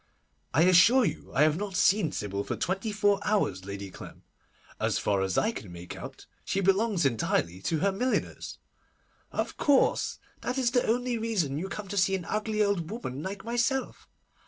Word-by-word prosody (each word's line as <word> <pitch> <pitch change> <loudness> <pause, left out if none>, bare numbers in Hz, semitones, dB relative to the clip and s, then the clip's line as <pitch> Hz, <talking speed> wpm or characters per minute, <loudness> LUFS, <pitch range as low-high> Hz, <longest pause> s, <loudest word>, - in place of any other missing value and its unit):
'I 160 - +5
assure 185 +8 +6
you 160 - -4
I 140 - +3
have 155 0 +3
not 200 -1 -4
seen 190 -6 +3
Sybil 100 -4 -3
for - - -3
twenty 195 +4 -2
four 205 -1 +2
hours, 100 - 0
Lady 100 -1 -6
Clem. - - -11 0.6
As - - +1
far 100 -2 +1
as 95 -1 -1
I 220 - +2
can 105 - -8
make 85 0 -8
out, - - -9 0.2
she 195 - -1
belongs 195 -2 +2
entirely 95 -7 0
to 160 - -1
her 200 +1 +3
milliners.' 250 +7 -2 0.7
'Of - - -3
course; 280 -3 +2 0.2
that 250 - -3
is 250 -2 +2
the 245 -1 +2
only 245 +1 0
reason 185 -11 -1
you 190 +3 -4
come 210 0 -6
to 205 - -5
see 195 0 +3
an 180 -3 -5
ugly 215 +1 0
old 195 -5 0
woman 150 - -5
like 190 +5 -6
myself. 240 +3 -1
195 Hz, 180 wpm, -28 LUFS, 145-220 Hz, 0.7 s, assure